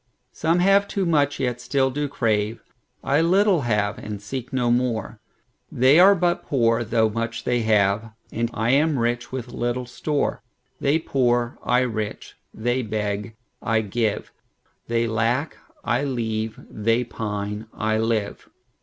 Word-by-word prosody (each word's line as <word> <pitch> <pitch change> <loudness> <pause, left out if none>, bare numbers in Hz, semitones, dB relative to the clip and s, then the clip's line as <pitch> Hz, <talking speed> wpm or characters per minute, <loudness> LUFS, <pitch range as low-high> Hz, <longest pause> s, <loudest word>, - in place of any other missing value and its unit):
Some 165 +2 +1
have 195 +2 +4
too 195 -2 -1
much, 145 -4 +2
yet 125 -2 -1
still 135 -1 +1
do 145 +2 -2
crave;I 115 +4 -2
little 185 +1 +3
have, 105 -4 0
and 105 -1 -6
seek 125 +5 -6
no 125 -2 +1
more. 120 -4 -1 0.5
They 130 +6 +5
are 195 +2 +8
but 175 -1 +1
poor, 115 -3 +1
though 110 0 +2
much 115 +1 -3
they 120 -1 +1
have, 105 0 +2 0.2
And 115 +1 -1
I 115 +1 0
am 150 +2 +3
rich 120 0 -1
with 130 -2 -5
little 120 +1 -2
store; 145 +4 -2 0.4
They 140 +3 +2
poor, 120 -6 0
I 125 +1 +3
rich; 110 -4 -4 0.2
they 120 +3 -1
beg, 105 -1 -3 0.3
I 115 -1 +1
give; 110 +1 -2 0.6
They 115 0 +1
lack, 115 +6 0 0.3
I 120 +3 0
leave; 110 -5 -2
they 115 +3 0
pine, 105 -2 -4
I 110 0 -1
live. 110 -2 -2
120 Hz, 145 wpm, -23 LUFS, 110-135 Hz, 0.6 s, are